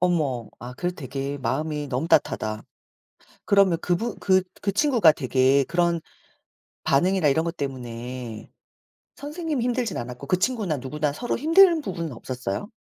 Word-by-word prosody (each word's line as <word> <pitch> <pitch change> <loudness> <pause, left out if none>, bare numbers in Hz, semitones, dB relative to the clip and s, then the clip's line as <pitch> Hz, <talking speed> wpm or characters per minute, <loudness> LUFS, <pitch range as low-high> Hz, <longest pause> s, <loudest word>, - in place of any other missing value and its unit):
어머. 150 -10 0
아 125 +1 -8
그래도 175 +6 -3
되게 135 +1 -4
마음이 150 +3 -2
너무 135 +6 -2
따뜻하다. 110 -8 +1 0.8
그러면 195 -4 +4
그분 200 +6 -1
그 190 -1 +3 0.2
그 200 - 0
친구가 230 - +5
되게 130 +1 +3
그런 170 +2 +1 0.8
반응이나 175 +4 +3
이런 160 +4 +2
것 170 +1 -3
때문에 125 -3 -6 0.7
선생님이 300 -3 -3
힘들진 245 -1 -1
않았고 125 +3 -6
그 185 - +1
친구나 210 -7 0
누구나 150 +3 -2
서로 240 - -3
힘든 330 +4 +6
부분은 170 - -4
없었어요? 125 - -5
160 Hz, 320 characters per minute, -24 LUFS, 130-200 Hz, 0.8 s, 힘든